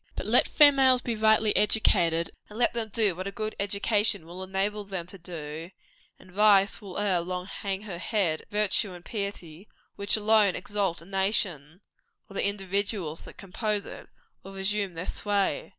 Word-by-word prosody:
But - - -5
let - - +4
females 270 -4 +5
be 235 - -2
rightly 220 0 +3
educated, 170 -6 +2 0.2
and 210 - -10
let 240 0 +2
them 230 -2 -2
do 210 -3 +2
what 185 +2 -5
a - - -4
good 215 0 -4
education 205 -2 0
will 175 +3 -9
enable 195 +2 -2
them 190 -4 -5
to 185 +2 -12
do, 165 -1 -7 0.5
and 185 - -18
vice 205 +1 +4
will 195 -3 -8
ere 200 -3 +1
long 180 +1 -4
hang 195 0 -5
her 185 -5 -7
head, 185 -7 0
and - - -24
virtue 210 -1 0
and 175 -1 -12
piety 200 -4 -5 0.3
which 200 +2 +3
alone 210 -3 +4
exalt 195 -3 -2
a - - -16
nation, 190 -4 -1 0.5
or - - -14
the 200 - +1
individuals 195 -4 -2
that - - -13
compose 205 +2 -3
it - - -11 0.3
will 195 0 -11
resume 195 -1 -1
their 165 +2 -5
sway. 205 - -1
200 Hz, 175 wpm, -27 LUFS, 180-210 Hz, 0.5 s, females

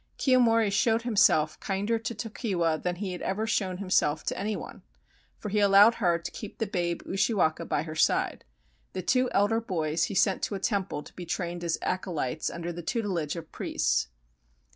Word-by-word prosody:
Kiyomori 230 -5 +3
showed 225 +3 +2
himself 200 -9 +3
kinder 205 +3 -1
to 225 +1 -4
Tokiwa 195 -7 -1
than 180 -1 -1
he 190 +1 -4
had 180 - -6
ever 205 +3 -1
shown 190 -5 -1
himself 170 -5 +1
to - - -2
any 215 +1 -2
one, 180 - -8 0.6
for 210 - -6
he 210 +1 +1
allowed 205 +2 +7
her 175 -3 +3
to 170 - -7
keep 210 - -8
the 225 - -1
babe 175 -4 -2
Ushiwaka 190 -4 +1
by 145 - 0
her 155 -1 -7
side. 155 - +1 0.5
The 185 - -4
two 255 +6 +2
elder 205 +3 +2
boys 165 -6 -1
he 200 - -5
sent 190 0 +2
to 205 - -2
a - - -4
temple 195 -7 -1
to - - -14
be 175 -2 -8
trained 175 0 -3
as 170 -1 0
acolytes 165 -6 -2
under 170 0 -5
the 175 - -6
tutelage 180 - -2
of 165 -2 -8
priests. - - 0
190 Hz, 185 wpm, -28 LUFS, 170-215 Hz, 0.6 s, allowed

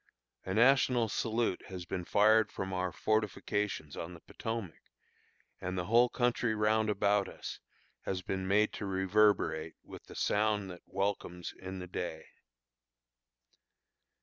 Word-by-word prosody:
A 95 - -2
national 125 -1 +4
salute 115 -2 0
has 90 -2 -7
been 90 0 -4
fired 110 +2 +4
from 95 0 -4
our 90 0 -1
fortifications 105 -6 -1
on 85 +2 -6
the - - -12
Potomac, 115 -2 -5 0.8
and 95 0 -4
the 90 - -1
whole 120 +4 +5
country 120 -2 +1
round 110 0 +2
about 100 -1 +2
us - - -7 0.5
has 95 -1 -2
been 95 +1 -3
made 105 +2 +3
to 105 - -4
reverberate 95 -4 +2
with - - -11
the - - -12
sound 105 -2 +1
that 90 - -10
welcomes 95 -3 -2
in 95 0 -7
the 90 - -6
day. 85 -2 -5
100 Hz, 135 wpm, -32 LUFS, 90-110 Hz, 0.8 s, whole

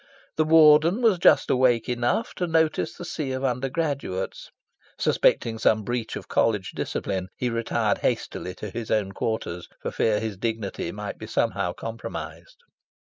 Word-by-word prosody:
The 155 - +3
Warden 160 +6 +6
was 215 -6 +4
just 150 -5 +5
awake 125 -3 +3
enough 120 - 0
to 180 - -1
notice 160 -1 +1
the 175 - -8
sea 150 -6 -3
of 130 +1 -3
undergraduates. 135 - -2 0.5
Suspecting 115 -1 +2
some 110 -1 +3
breach 120 0 -3
of - - -7
College 105 -4 +1
discipline, 95 -1 -3
he 125 -1 -1
retired 115 0 0
hastily 90 - -2
to 105 - -7
his 115 0 -5
own 105 -3 +1
quarters, 95 -5 -3
for - - -4
fear 105 -2 +1
his 110 -3 -4
dignity 110 -1 -3
might - - -6
be - - -7
somehow - - 0
compromised. 115 - -7
120 Hz, 150 wpm, -25 LUFS, 110-155 Hz, 0.5 s, Warden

